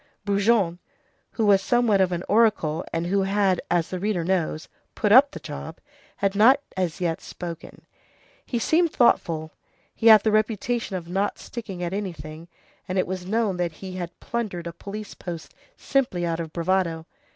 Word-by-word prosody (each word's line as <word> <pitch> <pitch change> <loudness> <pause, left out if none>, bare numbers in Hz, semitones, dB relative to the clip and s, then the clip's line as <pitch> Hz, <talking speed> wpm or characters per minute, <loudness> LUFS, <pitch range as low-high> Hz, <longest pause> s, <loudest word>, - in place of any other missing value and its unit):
Brujon, 200 -3 +2 0.5
who 225 - 0
was 200 -2 +5
somewhat 230 -3 +3
of 185 -1 +2
an 175 0 -2
oracle, 205 -8 +2
and 165 +1 -2
who 195 +3 +1
had, 195 -1 +1
as 175 -2 +1
the 185 - -3
reader 195 -3 -1
knows, 165 -3 -1 0.3
"put 210 - +1
up 265 +5 +8
the - - -9
job," - - -8 0.4
had 195 -1 0
not 235 +7 +6 0.2
as 180 -5 -2
yet 170 -3 -1
spoken. 170 -2 -9 0.6
He 240 - -3
seemed 325 +7 +2
thoughtful. 160 -9 +2 0.4
He 225 - 0
had 215 -2 +9
the 220 - +2
reputation 215 0 0
of 175 -2 -5
not 195 +3 -1
sticking 195 -7 -7
at 175 +1 -3
anything, 165 -5 -6 0.4
and 185 0 -2
it 185 - +2
was 185 -1 -5
known 215 -2 0
that 175 -2 -1
he 185 +3 -8
had 175 -1 -6
plundered 215 -8 -4
a 170 - -5
police 205 +4 -8
post 170 -3 -8 0.2
simply 240 -11 0
out 165 -1 -2
of 165 -2 -5
bravado. 170 -1 0
190 Hz, 175 wpm, -24 LUFS, 170-215 Hz, 0.6 s, had